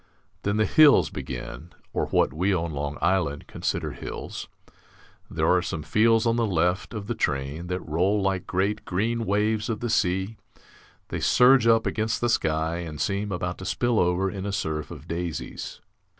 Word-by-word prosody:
Then 100 +1 0
the 110 - +3
hills 155 +3 +6
begin, 70 +6 -7 0.2
or - - 0
what - - +2
we 95 +5 +1
on 85 -1 -2
Long 70 0 -3
Island 85 -5 +1
consider - - -3
hills. - - -7 0.8
There - - -1
are 90 0 +4
some 80 -3 -4
fields 115 +6 +3
on 115 0 +2
the 115 -1 +1
left 90 +3 0
of 105 -2 -5
the - - -2
train 70 +5 -2
that 90 0 -4
roll 90 +7 +1
like 95 -2 -1
great 100 +3 0
green 115 +5 -1
waves 105 +2 +1
of 110 -2 -2
the 120 -1 -2
sea; 95 +1 0 0.7
they - - -3
surge 125 -1 +5
up 115 -1 +4
against 110 0 -1
the 120 - +1
sky 80 -4 0
and 80 -4 -6
seem 100 +1 -1
about 90 -1 -3
to 95 - -7
spill 120 +3 +1
over 90 +2 +2
in 95 0 -4
a - - -2
surf 80 -6 -2
of 75 +3 -10
daisies. 85 -1 -5
95 Hz, 180 wpm, -25 LUFS, 85-110 Hz, 0.8 s, hills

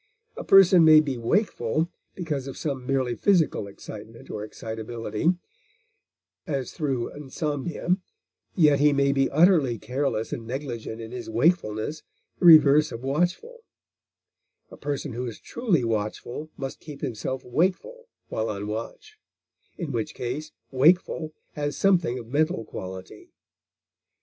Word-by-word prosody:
A - - -6
person 190 -3 +7
may 155 -1 +8
be 140 -5 -1
wakeful 155 - 0 0.3
because 150 -7 -3
of 135 - -7
some 135 -4 -4
merely 130 -3 +1
physical 160 - +2
excitement 110 +3 -11
or 105 - -4
excitability, 110 - -2 1.1
as 135 -4 -2
through 135 -6 -2
insomnia; 150 +4 -2 0.6
yet 150 -6 +5
he 145 0 +5
may 140 0 +3
be 135 -1 +2
utterly 155 -6 +4
careless 125 -1 -2
and 115 -2 -6
negligent 120 -4 -5
in 110 0 -8
his 125 -2 -6
wakefulness, 120 +1 +1 0.4
the - - 0
reverse 155 -1 +7
of 115 - -7
watchful; 175 - -1 1.1
a - - -10
person 145 -2 -4
who 125 +2 -3
is 115 - -7
truly 205 - 0
watchful 115 +6 -3
must 135 -1 -5
keep 150 -3 -10
himself 130 +3 -4
wakeful 190 - -1 0.2
while 110 0 -2
on 100 -1 -4
watch, 115 - -7 0.6
in 165 -5 -4
which 115 -4 -3
case 135 +6 -4 0.2
wakeful 155 +3 +3 0.2
has 145 -1 -3
something 175 -10 +2
of 120 - -7
mental 145 0 0
quality. 95 -1 -9
140 Hz, 130 wpm, -25 LUFS, 115-160 Hz, 1.1 s, may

